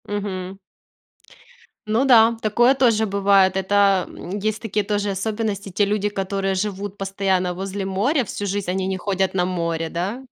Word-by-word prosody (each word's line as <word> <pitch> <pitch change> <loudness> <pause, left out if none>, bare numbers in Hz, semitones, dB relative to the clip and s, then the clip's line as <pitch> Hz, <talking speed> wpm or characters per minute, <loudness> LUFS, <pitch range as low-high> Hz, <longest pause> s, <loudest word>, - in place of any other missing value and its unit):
Мгм. 195 -2 -4 1.3
Ну 225 +5 +2
да, 230 -3 +6
такое 240 +5 +3
тоже 230 -5 +2
бывает. 195 -1 +3
Это, 195 -1 +3
м, 190 +3 -7
есть 215 +2 -2
такие 210 -2 -2
тоже 205 0 -1
особенности. 205 0 -3
Те 200 +3 +1
люди, 205 0 0
которые 195 -1 -2
живут 200 0 -3
постоянно 190 -2 -1
возле 195 +1 -4
моря 225 +10 +1
всю 205 -1 -5
жизнь, 200 -1 -2
они 190 +1 -1
не 190 0 -2
ходят 190 0 -1
на 180 -2 +1
море, 170 -2 -2
да? 195 +10 -4
200 Hz, 155 wpm, -22 LUFS, 190-210 Hz, 1.3 s, да